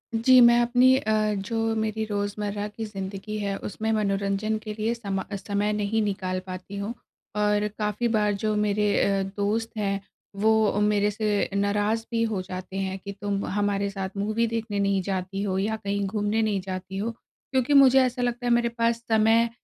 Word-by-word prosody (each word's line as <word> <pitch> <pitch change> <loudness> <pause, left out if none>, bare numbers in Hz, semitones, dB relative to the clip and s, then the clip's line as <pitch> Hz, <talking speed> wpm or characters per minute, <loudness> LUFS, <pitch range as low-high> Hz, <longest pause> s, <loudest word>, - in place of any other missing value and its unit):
जी, 255 +3 +6
मैं 235 0 +7
अपनी 245 +2 +5
अ, 215 -3 +1
जो 205 +3 -3 0.2
मेरी 220 0 -1
रोज़मर्रा 205 0 -2
की 215 +2 -6
ज़िंदगी 195 +1 -6
है 200 -1 -2
उसमें 220 +2 -2
मनोरंजन 200 +1 0
के 215 - -5
लिए 220 +2 0
समा 200 -5 -3
समय 205 +1 -1
नहीं 210 +1 0
निकाल 190 -2 -2
पाती 185 +2 -7
हूँ। 200 +4 -3 0.4
और 210 0 +2
काफ़ी 210 +2 -1
बार 210 -1 +2
जो 215 -1 +1
मेरे 210 0 +1
अ, 195 -1 +2 0.2
दोस्त 215 +3 0
हैं, 200 -2 0 0.4
वो 215 0 +3
मेरे 210 0 +2
से 210 -1 0
नाराज़ 205 +3 +1
भी 230 -1 +1
हो 220 -4 -1
जाते 185 0 -7
हैं 190 0 -2
की 200 +1 -7
तुम 200 0 -3
हमारे 200 0 0
साथ 195 0 -5
मूवी 215 +3 0
देखने 225 -2 -3
नहीं 200 -1 +2
जाती 190 +1 -3
हो 190 -2 -1
या 215 +3 0
कहीं 200 0 -1
घूमने 210 +2 0
नहीं 210 -3 0
जाती 185 0 -6
हो, 220 +4 -2
क्योंकि 260 +3 -3
मुझे 270 -2 +7
ऐसा 250 -1 0
लगता 245 0 -1
है - - +2
मेरे 235 0 +2
पास 230 0 0
समय 225 +1 +4
210 Hz, 180 wpm, -26 LUFS, 200-225 Hz, 0.4 s, मैं